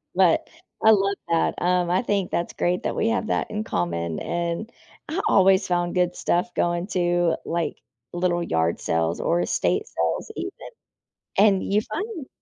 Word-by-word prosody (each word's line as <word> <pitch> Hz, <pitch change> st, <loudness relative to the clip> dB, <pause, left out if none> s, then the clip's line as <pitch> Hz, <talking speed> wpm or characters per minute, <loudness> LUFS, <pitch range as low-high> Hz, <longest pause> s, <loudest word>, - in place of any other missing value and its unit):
but -, -, +3 dB, 0.4 s
I -, -, +8 dB
love 200 Hz, -1 st, +3 dB
that, 165 Hz, -1 st, +2 dB
um, 180 Hz, -1 st, +2 dB
I 185 Hz, +7 st, +2 dB
think 200 Hz, -5 st, -1 dB
that's 170 Hz, -, -2 dB
great 180 Hz, +1 st, 0 dB
that -, -, -2 dB
we -, -, +1 dB
have 230 Hz, -1 st, 0 dB
that -, -, -1 dB
in 215 Hz, 0 st, -3 dB
common, 85 Hz, -, -2 dB
and 170 Hz, +5 st, -3 dB, 0.4 s
I 335 Hz, +5 st, -1 dB
always 190 Hz, 0 st, +5 dB
found 175 Hz, 0 st, 0 dB
good 180 Hz, 0 st, +2 dB
stuff 180 Hz, +7 st, 0 dB
going 175 Hz, +2 st, 0 dB
to, 175 Hz, -3 st, +1 dB
like, 170 Hz, 0 st, -2 dB, 0.3 s
little 175 Hz, 0 st, 0 dB
yard 80 Hz, -, 0 dB
sales 80 Hz, 0 st, 0 dB
or 170 Hz, -, +1 dB
estate 425 Hz, -, 0 dB
sales -, -, -2 dB
even. -, -, -4 dB, 0.9 s
And 200 Hz, -2 st, +5 dB
you 210 Hz, +2 st, +1 dB
find 410 Hz, -, -4 dB
180 Hz, 165 wpm, -24 LUFS, 170-205 Hz, 0.9 s, I